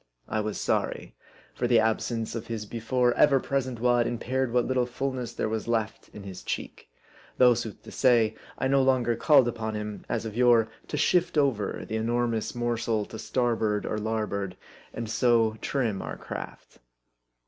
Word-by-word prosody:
I 110 - -1
was 105 -1 -2
sorry; - - -1 0.4
for 120 - -1
the 120 -1 +4
absence 110 +1 0
of 115 - -5
his 110 -2 -4
before 120 +3 +1
ever 140 0 +5
present 130 -3 -2
wad 120 0 +3
impaired 130 +1 -1
what 125 0 +2
little 125 -1 +1
fullness 125 -1 -3
there - - -2
was 110 0 -3
left 110 -2 -2
in 105 - -11
his 95 -2 -8
cheek; - - -5 0.5
though, 125 -1 +7
sooth 110 -2 -5
to - - -11
say, 115 -4 +3 0.2
I 135 - 0
no 135 0 +4
longer 130 -3 +2
called 130 +1 +5
upon 110 -2 -3
him 105 0 -5
as - - -1
of 110 -1 -5
yore 120 -2 +4 0.2
to 150 - -3
shift 170 +3 +2
over 130 -9 0
the 110 - -2
enormous 115 0 -1
morsel 115 -2 -1
to 110 - -9
starboard 115 -4 0
or 105 - -2
larboard, 105 -4 -2 0.3
and 115 0 -5
so 115 -1 +2
trim 115 -8 -1
our - - -6
craft. - - -8
115 Hz, 170 wpm, -27 LUFS, 110-125 Hz, 0.5 s, though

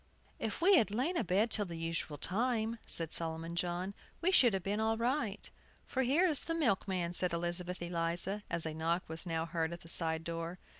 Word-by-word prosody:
"If - - -3
we 380 +2 +7
had 220 - +3
lain 255 - 0
abed 210 - +1
till 205 - +4
the 170 -1 -6
usual 165 -2 -3
time," 225 - 0
said 165 -1 0
Solomon 165 0 0
John, 180 +2 -2 0.3
"we 355 +3 +2
should 240 - +6
have 190 - -3
been 205 +2 -1
all 220 0 +1
right." 230 -3 -1 0.4
"For 265 - -1
here 280 +8 +3
is 310 -6 +2
the 330 - -1
milkman!" 190 - 0
said 180 0 0
Elizabeth 175 +1 -1
Eliza, 175 +4 -1
as 165 - 0
a 160 - -2
knock 165 +3 -1
was 160 +3 -3
now 165 -1 -1
heard 165 0 -2
at 170 - -8
the 165 - -13
side 160 -1 -1
door. 165 +1 -4
180 Hz, 200 wpm, -34 LUFS, 165-225 Hz, 0.4 s, we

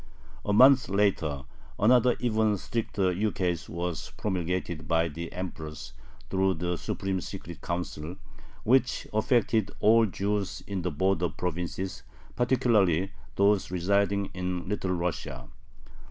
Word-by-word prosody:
A - - -1
month 130 +2 +6
later 95 -8 +1 0.3
another 125 +2 +5
even 110 -3 +2
stricter 100 -3 -1
ukase 90 -4 -1
was 85 -4 -4
promulgated 90 -4 -2
by 80 0 +2
the 85 +2 -6
Empress 80 -7 -6 0.4
through 95 0 +2
the 90 +2 -1
Supreme 95 +4 -2
Secret - - -8
Council, 85 -1 -4 0.5
which 125 +2 +2
affected 110 -1 +2
all 115 +1 +5
Jews 100 +1 -2
in 100 -2 -3
the 90 - -1
border 90 +2 +1
provinces, 90 +3 -4 0.3
particularly 110 -8 +2 0.2
those 100 0 +3
residing 100 +2 +1
in 90 -1 -3
Little 95 -2 -1
Russia. 75 -7 -3
95 Hz, 115 wpm, -28 LUFS, 85-105 Hz, 0.5 s, month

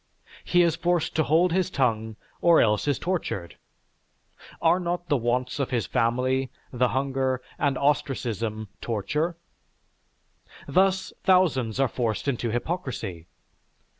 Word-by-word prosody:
He 175 0 +4
is 165 -2 +2
forced 175 -1 0
to 160 - +3
hold 165 +4 +3
his 185 0 +1
tongue, 110 -7 0 0.3
or 170 -1 +6
else 105 +4 +2
is 145 - +2
tortured. 165 - -3 1.0
Are 170 +2 +3
not 175 0 -3
the 145 - +3
wants 125 +2 -1
of 135 - 0
his 120 -5 0
family, 130 +3 0 0.2
the 125 0 +2
hunger, 130 0 0 0.2
and 140 -3 +1
ostracism 115 -6 -1
torture? 150 - -1 1.3
Thus 190 +1 +2
thousands 140 - +3
are 135 - +4
forced 115 0 -2
into 120 -3 -1
hypocrisy. 120 - -4
135 Hz, 125 wpm, -26 LUFS, 115-170 Hz, 1.3 s, or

